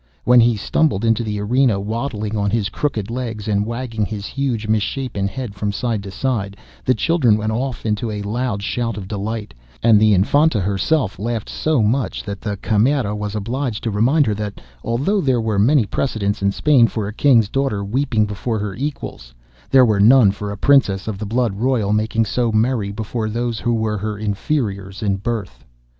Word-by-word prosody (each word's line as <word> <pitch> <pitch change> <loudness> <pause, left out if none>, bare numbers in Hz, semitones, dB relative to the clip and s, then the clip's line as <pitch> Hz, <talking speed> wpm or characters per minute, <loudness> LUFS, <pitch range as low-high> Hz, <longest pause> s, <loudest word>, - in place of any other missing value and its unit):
When 125 0 +6
he 115 -1 +4
stumbled 115 0 +1
into 115 0 +2
the 105 -2 -3
arena, 115 0 +2
waddling 110 0 -3
on 100 -1 0
his 105 -1 0
crooked 110 -5 -2
legs 115 -4 -4
and 105 0 0
wagging 115 -2 -3
his 100 +1 -4
huge 125 -5 -2
misshapen 110 -1 -1
head 120 0 -5
from 100 +1 -2
side 115 0 -2
to 100 - -8
side, 100 -2 -2 0.3
the 130 - +2
children 125 -3 +2
went 110 0 -2
off 125 +2 -3
into 110 +1 -1
a 105 -1 -4
loud 110 -1 -2
shout 115 0 -2
of 95 -3 -6
delight, 105 +1 -4 0.3
and 110 -2 +6
the 105 -1 +5
Infanta 140 - +3
herself 100 - 0
laughed 115 0 -3
so 155 -7 +1
much 120 +4 0
that 100 -1 -6
the 105 -2 -3
Camerera 110 +2 +1
was 105 0 -4
obliged 115 +2 -3
to 115 - -1
remind 130 +9 +3
her 110 - 0
that 105 0 -5 0.2
although 140 - 0
there 130 -5 +2
were 110 -3 0
many 125 +3 +4
precedents 100 -3 -2
in 100 0 +2
Spain 130 +1 +4
for 110 -3 -3
a 105 - -6
King's 120 -4 +4
daughter 110 -5 -1
weeping 115 0 +1
before 105 +3 -3
her 105 -1 -3
equals, 110 - -6 0.3
there 130 -1 +6
were 105 -3 +2
none 110 0 +6
for 105 +1 -6
a 100 - -6
Princess 105 -8 +3
of 105 -3 -4
the 105 - -4
blood 120 -1 0
royal 110 -1 0
making 110 +1 +1
so 120 +2 0
merry 110 -2 +1
before 110 +1 -3
those 115 0 -2
who 120 -1 0
were 110 -2 -1
her 105 +1 -3
inferiors 100 - -2
in 100 -2 +1
birth. 100 - -4
110 Hz, 190 wpm, -20 LUFS, 100-125 Hz, 0.3 s, When